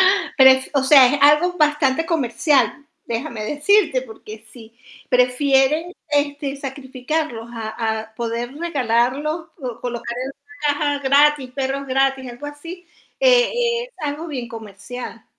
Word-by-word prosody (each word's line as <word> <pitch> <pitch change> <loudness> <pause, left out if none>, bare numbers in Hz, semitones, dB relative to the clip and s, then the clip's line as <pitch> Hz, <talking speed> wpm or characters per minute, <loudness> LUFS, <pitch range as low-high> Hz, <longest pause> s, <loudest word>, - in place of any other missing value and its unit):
Ah, 395 - -5
pero 265 -1 +8
es 260 0 +1
o 275 - +2
sea, 270 -2 +8
es - - -1
algo 300 +5 +5
bastante 295 -1 +1
comercial, 285 -1 +1 0.2
déjame 230 -1 -4
decirte, 300 - +2
porque 220 -2 -12
si 230 -2 -15 0.3
prefieren, 270 +6 +2 0.2
este, 285 -1 -1
sacrificarlos 265 -2 -4
a 220 -1 -3
a - - -34
poder 235 +2 -4
regalarlos, 290 +1 -1
o 245 -5 -6
colocar 240 -1 -5
el 270 - -6 0.4
caja, 290 -1 -1
gratis, 280 -1 +3
perros 270 +1 -3
gratis, 270 0 0
algo 245 +5 -9
así, 335 +5 -10 0.3
e 485 -1 +3
es - - -13
algo 295 +3 -4
bien 260 -7 -5
comercial. 225 +1 -9
270 Hz, 135 wpm, -20 LUFS, 245-300 Hz, 0.4 s, pero